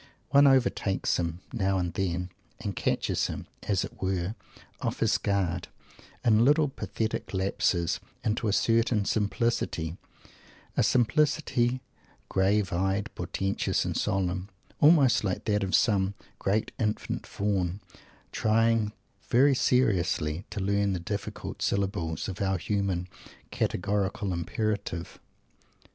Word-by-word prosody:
One 140 0 +7
overtakes 125 -7 +2
him, 85 0 -2
now 95 -4 +1
and 90 -2 -1
then, 90 -1 -2 0.3
and - - -4
catches - - 0
him, - - -6 0.2
as 100 -3 0
it - - -13
were, 95 0 -1 0.5
off - - -2
his - - +2
guard, 95 -3 0 0.6
in 110 -1 +5
little 150 +3 +4
pathetic 110 -6 -3
lapses 95 -2 +1 0.2
into 110 +1 0
a - - +2
curious 115 0 +2
simplicity 105 -6 -1 0.8
a - - +3
simplicity 130 -1 +2 0.5
grave 100 +1 +2
eyed, 95 +3 0
portentious 95 0 -1
and - - -2
solemn 95 -2 -1 0.3
almost 145 -7 +6
like 95 -3 -2
that 105 -1 +1
of 95 - +1
some 100 -3 +2 0.2
great 105 +3 0
Infant 105 -1 -2
Faun, 95 -2 -1 0.5
trying 110 -1 +2 0.4
very 135 +4 +5
seriously 90 -10 +1
to - - -5
learn 100 0 +1
the 90 - -2
difficult 100 +4 -5
syllables 90 -5 -1
of 95 0 -5
our 95 -1 +1
human 95 -1 -1 0.4
"Categorical 100 +1 -1
Imperative"! 90 0 -3
100 Hz, 120 wpm, -28 LUFS, 95-110 Hz, 0.8 s, One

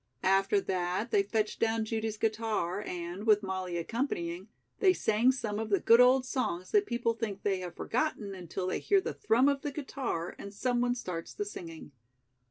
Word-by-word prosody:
After 195 +1 +3
that 185 +4 -2
they 205 - +4
fetched 210 +1 -1
down 225 0 +1
Judy's 220 -1 -2
guitar 215 -4 -1
and, 180 +2 -5
with 210 -1 +5
Molly 185 -2 -3
accompanying, 175 - -3 0.3
they 375 -2 +5
sang 225 -3 +3
some 215 -5 -3
of 220 0 -3
the 200 - +3
good 230 +2 +6
old 255 +1 +5
songs 185 -9 -2
that 415 -1 +3
people 235 -1 0
think 215 -4 -4
they 195 -2 +1
have 180 -2 -7
forgotten 230 -6 -2
until 180 0 -5
they 185 - -1
hear 400 -1 +3
the - - -4
thrum 255 - +3
of 280 -1 +1
the 295 - -2
guitar 265 - -4
and 200 0 -8
someone 245 +1 +1
starts 180 -8 -6
the 415 - -2
singing. 165 - -8
215 Hz, 180 wpm, -30 LUFS, 185-245 Hz, 0.3 s, good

